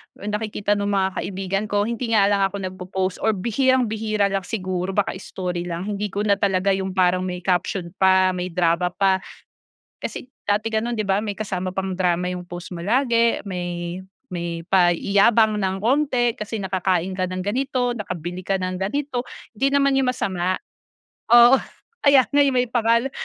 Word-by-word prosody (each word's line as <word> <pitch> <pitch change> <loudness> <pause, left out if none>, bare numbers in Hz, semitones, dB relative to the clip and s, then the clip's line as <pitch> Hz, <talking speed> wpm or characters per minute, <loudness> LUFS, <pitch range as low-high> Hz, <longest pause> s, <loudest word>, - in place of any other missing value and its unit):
nakikita 210 0 -3
nung 200 0 -1
mga 190 0 +1
kaibigan 195 +1 -2
ko. 205 0 +1
Hindi 230 0 -1
nga 200 - +5
lang 200 - +2
ako 195 - -9
nagpopost 185 0 -3
or 220 -1 +1
bihirang 255 +6 +2
bihira 215 -2 0
lang 195 -1 -1
siguro 185 -3 -3
baka 205 - +1
story 180 -2 -4
lang. 170 +1 -4
Hindi 210 0 -2
ko 205 +1 -3
na 200 -1 +2
talaga 195 -1 +2
yung 190 0 -2
parang 180 0 +3
may 180 -1 -5
caption 180 -1 -1
pa, 190 0 +5
may 180 0 -3
drama 170 0 +1
pa. 190 -1 +3 0.8
Kasi - - -5 0.2
dati 205 +2 0
gano'n 225 +1 -1
'di 215 - -1
ba? 195 +2 +1
May 205 -2 -4
kasama 185 -3 -3
pang 190 0 -3
drama 180 -1 0
yung 180 0 -3
post 175 +1 -8
mo 170 - -6
lagi, 235 +2 +2
may 175 -1 -4 0.3
may 170 -1 -4
paiyabang 200 +5 +4
ng 190 0 0
konti, 245 +1 +1
kasi 220 -2 -5
nakakain 185 -2 0
ka 185 -1 -1
ng 185 0 -4
ganito, 250 +2 0
nakabili 180 -5 -5
ka 195 +1 0
ng 185 0 -3
ganito. 250 +4 -2 0.3
Hindi 270 - +1
naman 275 -1 +3
yung 265 -2 +2
masama 185 -6 -1 0.7
oo 240 +2 +9 0.5
kaya 280 -3 +6
nga, 290 - +3
eh, 280 - +3
may 250 0 +2
pangalan, 235 +2 +2
195 Hz, 175 wpm, -22 LUFS, 185-225 Hz, 0.8 s, oo